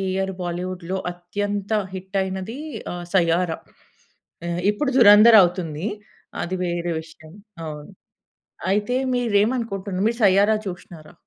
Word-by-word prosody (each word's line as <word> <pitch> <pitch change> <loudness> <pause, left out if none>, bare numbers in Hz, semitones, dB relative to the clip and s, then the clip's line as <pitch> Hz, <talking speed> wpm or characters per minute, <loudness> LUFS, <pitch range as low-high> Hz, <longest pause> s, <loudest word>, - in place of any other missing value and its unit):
Year 190 0 -1
బాలీవుడ్‌లో 180 +1 -4
అత్యంత 205 +3 -4 0.2
hit 190 +1 -4
అయినది 190 +6 -5 0.3
ఆహ్, 175 0 -6
'సయ్యారా'. 170 -1 +2 0.9
ఆహ్, 170 0 -2
ఇప్పుడు 265 +7 -1
'దురంధర్' 215 0 +9
అవుతుంది. 175 -1 -2 0.6
అది 180 - -3
వేరే 175 -1 -2
విషయం. 160 -1 -16 0.3
అవును. 150 -1 -8 0.8
అయితే 210 +5 0 0.2
మీరేమనుకుంటున్నారు? 210 -4 0
మీరు 235 +1 -5
'సయ్యారా' 200 +2 +5
చూసినారా? 175 -3 -9
190 Hz, 105 wpm, -22 LUFS, 175-205 Hz, 0.9 s, దురంధర్